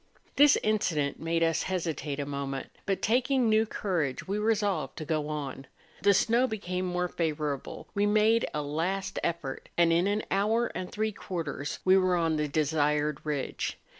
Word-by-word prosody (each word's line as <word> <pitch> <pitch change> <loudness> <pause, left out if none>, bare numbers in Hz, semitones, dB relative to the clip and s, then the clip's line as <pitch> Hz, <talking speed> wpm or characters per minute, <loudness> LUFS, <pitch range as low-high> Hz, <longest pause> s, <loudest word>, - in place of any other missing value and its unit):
This 290 0 +7
incident 165 -9 0
made 165 +1 0
us 165 -1 +2
hesitate 160 -6 -2
a 145 - -1
moment, 140 -1 -4 0.2
but 195 -1 -1
taking 250 +2 +2
new 220 0 +3
courage, 170 -9 -2
we 200 +2 -1
resolved 210 -6 0
to 155 - -5
go 155 -1 -1
on; 140 -3 -5 0.3
the 200 -1 +5
snow 235 +6 +3
became 185 -5 -3
more 180 0 -1
favourable; 150 -5 -3
we 205 0 +2
made 215 +2 +3
a 150 - -2
last 185 +7 -2
effort, 160 -6 -3
and 170 -1 +5
in 175 +3 +3
an 205 +1 0
hour 220 +5 +2
and 180 -1 -5
three 215 +1 -1
quarters 165 -8 -4
we 190 +1 +6
were 185 -1 +3
on 165 -2 +1
the 150 0 0
desired 150 0 +1
ridge. 150 -3 -3
175 Hz, 165 wpm, -29 LUFS, 150-205 Hz, 0.3 s, This